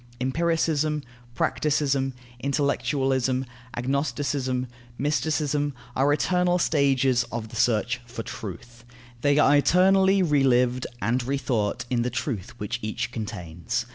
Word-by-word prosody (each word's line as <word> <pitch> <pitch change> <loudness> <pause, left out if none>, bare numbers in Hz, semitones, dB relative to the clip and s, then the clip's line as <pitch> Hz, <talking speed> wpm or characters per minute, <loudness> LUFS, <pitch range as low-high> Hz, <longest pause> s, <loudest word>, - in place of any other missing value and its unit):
Empiricism, 155 +1 0 0.3
practicism, 140 -3 +1 0.3
intellectualism, 135 -2 0 0.3
agnosticism, 130 0 -1 0.3
mysticism, 145 -1 0 0.2
are 135 +2 +3
eternal 180 +5 +2
stages 135 -6 +2
of 115 -2 -4
the 115 - -10
search 120 +1 +1
for 115 -1 -6
truth. 115 +5 -8 0.4
They 145 0 +3
are 145 -1 +5
eternally 190 +5 +4
relived 130 -5 +2 0.2
and 120 +4 +1
rethought 120 -4 -1
in 120 -2 +2
the 125 - 0
truth 120 -3 -4
which 115 +3 -3
each 120 +3 -3
contains. 90 -8 -4
135 Hz, 110 wpm, -25 LUFS, 120-145 Hz, 0.4 s, are